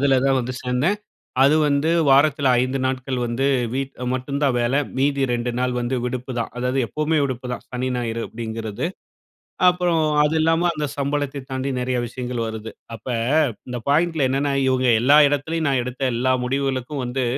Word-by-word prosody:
அதில 135 -1 +4
தான் 135 -1 +3
வந்து 125 0 -3
சேர்ந்தேன். 130 +11 +1 0.5
அது 140 +3 +5
வந்து 145 +2 +1 0.2
வாரத்தில 140 0 +4
5 130 +2 -1
நாட்கள் 130 0 -2
வந்து 120 +4 -1 0.3
வீட் 135 0 -2 0.2
மட்டுந்தான் 140 +1 -1
வேல. 120 +3 0 0.2
மீதி 140 0 +1
2 120 0 -1
நாள் 125 0 0
வந்து 120 +2 -1
விடுப்புதான். 125 -1 -3
அதாவது, 125 +2 -1
எப்பவுமே 155 +4 0
விடுப்புதான். 125 -2 -4
சனி, 125 +1 -2
ஞாயிறு 115 -1 -2
அப்டிங்கிறது. 110 +3 -4 0.8
அப்புறம் 180 -2 +2 0.2
அது 150 +2 +1
இல்லாம 165 +2 +2
அந்த 150 -1 -2
சம்பளத்தை 145 0 -2
தாண்டி 130 +1 -2
நெறைய 125 0 -1
விஷயங்கள் 125 -1 -4
வருது. 110 0 -6 0.2
அப்ப 110 - -11 0.6
இந்த 125 -1 -4
பாயிண்ட்ல 160 0 +2
என்னன்னா, 140 +1 0
இவுங்க 130 -1 +2
எல்லா 145 +4 +6
இடத்திலேயும் 155 +2 -1
நான் 130 -3 +1
எடுத்த 125 +1 -6
எல்லா 130 +2 +1
முடிவுகளுக்கும் 135 0 -2
வந்து 125 +1 -2
130 Hz, 155 wpm, -22 LUFS, 125-145 Hz, 0.8 s, எல்லா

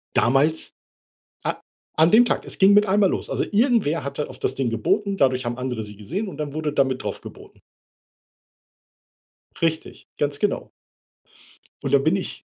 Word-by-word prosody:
Damals, 140 +6 +2 0.7
a - - -1 0.4
an 160 +2 +5
dem 240 +3 +7
Tag, - - -1
es - - -5
ging 195 +1 +6
mit 205 +1 +5
einmal 195 0 +3
los. - - -3
Also, - - 0
irgendwer 210 - +2
hatte 140 +2 -4
auf - - -11
das - - -1
Ding 135 -3 0
geboten, 195 - 0
dadurch 130 -4 +2
haben 120 0 -3
andere 125 -3 -3
sie 105 -1 -10
gesehen 185 - -4
und 145 - -10
dann 150 -2 -4
wurde 155 -2 -2
da 140 - +3
mit 130 -1 -3
drauf - - -4
geboten. - - -13 2.0
Richtig, 160 -2 -2
ganz 145 -1 0
genau. 205 - -1 1.1
Und 140 -2 -3
dann 140 -1 +5
bin 160 +5 +3
ich 190 - -5
150 Hz, 170 wpm, -23 LUFS, 130-195 Hz, 2.0 s, dem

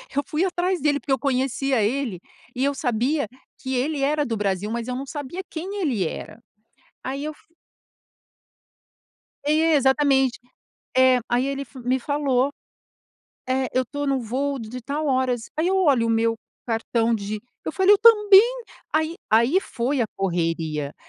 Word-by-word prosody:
Eu 285 - +1
fui 310 +3 0
atrás 360 0 -1
dele 290 0 +2
porque 275 - -6
eu 265 - +2
conhecia 265 -1 0
ele 230 -3 -1 0.4
e 255 - -1
eu 280 - +1
sabia 255 +1 0 0.3
que 265 0 -3
ele 285 +4 -1
era 295 +2 +1
do 230 -4 -2
Brasil 205 0 -1
mas 235 +1 -3
eu 250 - -3
não 270 +2 -4
sabia 290 +5 -6
quem 380 +5 -5
ele 250 - 0
era. 215 - -8 0.7
Aí 275 +3 -4
eu 310 - -3
fu - - -23 2.0
É, 310 +2 +3
exatamente. 270 -1 +3 0.6
É 260 -1 +6
aí 245 +2 +1
ele 275 0 -3
fa 270 -1 -13
me 255 +2 0
falou: 275 -1 0 1.0
"É, 260 0 0
eu 255 0 +1
tô 285 +3 -4
no 275 -1 +1
voo 270 +4 -2
de 235 +2 -7
tal 290 +5 -3
horas". 255 -3 0
Aí 315 +2 +1
eu 385 - +2
olho 280 -11 +3
o 230 - +1
meu 225 0 +2 0.3
cartão 230 0 0
de 210 0 -4 0.2
eu - - -3
falei: 380 +1 +5
"Eu 405 - +1
também!". 455 +2 +6 0.3
Aí 315 +1 0 0.2
aí 235 - +4
foi 260 -3 -2
a 230 - +2
correria, 165 -5 -2
265 Hz, 165 wpm, -23 LUFS, 235-295 Hz, 2.0 s, É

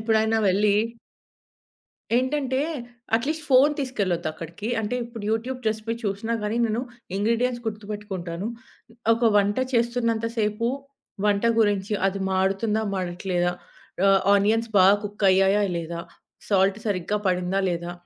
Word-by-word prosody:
ఎప్పుడైనా 220 0 +2
వెళ్లి 200 +2 +3 1.4
ఏంటంటే, 260 +1 0 0.6
అట్‌లీస్ట్ 305 +7 -2
ఫోను 275 +3 +6
తీసుకెళ్లొద్దు 200 - -1
అక్కడికి. 170 +7 -7
అంటే, 220 +4 -2
ఇప్పుడు 230 -2 -9
యూట్యూబ్ 245 +3 -2
రెసిపీ 220 +1 -3
చూసినా 205 +3 -2
గాని 210 +2 -1
నేను 225 +2 -1 0.4
ఇంగ్రీడియెంట్స్ 240 +3 0
గుర్తుపెట్టుకుంటాను. 205 -4 -5 0.7
ఒక 230 -1 +2
వంట 205 0 +2 0.2
చేస్తున్నంత 230 -1 +1
సేపు, 215 +2 0 0.6
వంట 205 +2 +2
గురించి 205 -1 +1
అది 195 0 -2
మాడుతుందా, 195 +4 +1
మాడట్లేదా, 175 -1 -1 0.6
ఆహ్, 195 0 +5
ఆనియన్స్ 220 +3 +2
బాగా 190 +2 +7
కుక్ 205 0 -2
అయ్యాయా, 195 +2 +4 0.2
లేదా, 170 0 -5 0.5
సాల్ట్ 195 0 +3
సరిగ్గా 205 +1 -1
పడిందా, 180 +1 0
లేదా, 170 0 -3
210 Hz, 115 wpm, -24 LUFS, 195-230 Hz, 1.4 s, బాగా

